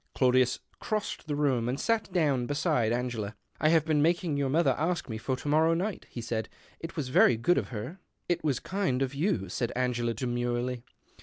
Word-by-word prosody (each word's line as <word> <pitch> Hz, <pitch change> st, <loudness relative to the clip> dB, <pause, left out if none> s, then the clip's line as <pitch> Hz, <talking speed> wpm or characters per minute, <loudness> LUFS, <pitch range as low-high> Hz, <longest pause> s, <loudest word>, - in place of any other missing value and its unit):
Claudius 130 Hz, -1 st, +3 dB, 0.2 s
crossed 215 Hz, -5 st, -3 dB
the 145 Hz, -, -1 dB
room 130 Hz, -5 st, +1 dB
nd 130 Hz, +3 st, -2 dB
sat 225 Hz, -4 st, 0 dB
down 145 Hz, -9 st, +1 dB
beside 145 Hz, -6 st, +1 dB
Anerela. 120 Hz, -4 st, -2 dB
" -, -, -36 dB
I 155 Hz, -, +4 dB
have 160 Hz, -2 st, +4 dB
been 155 Hz, -2 st, +2 dB
making 170 Hz, 0 st, +2 dB
your 140 Hz, -1 st, 0 dB
mother 160 Hz, +5 st, +3 dB
ask 170 Hz, +2 st, -1 dB
me 110 Hz, -3 st, -5 dB
or 130 Hz, -, +2 dB
to 145 Hz, -, -8 dB
morrow 160 Hz, +3 st, +4 dB
night," 190 Hz, +3 st, -3 dB
he 120 Hz, -, -6 dB
said. 115 Hz, -1 st, -3 dB, 0.2 s
" -, -, -28 dB
It 165 Hz, -, -7 dB
was 145 Hz, -5 st, -3 dB
very 125 Hz, -2 st, +5 dB
jood 175 Hz, +11 st, +2 dB
of -, -, -5 dB
her." 125 Hz, -, -6 dB
" -, -, -49 dB
It 175 Hz, -2 st, 0 dB
was 140 Hz, -5 st, +1 dB
kind 170 Hz, -9 st, -1 dB
of 135 Hz, 0 st, -3 dB
you," 140 Hz, -, 0 dB
said 115 Hz, +6 st, -2 dB
Angela, 120 Hz, -2 st, 0 dB
demurely. 120 Hz, +1 st, -2 dB
135 Hz, 215 wpm, -29 LUFS, 120-160 Hz, 0.2 s, very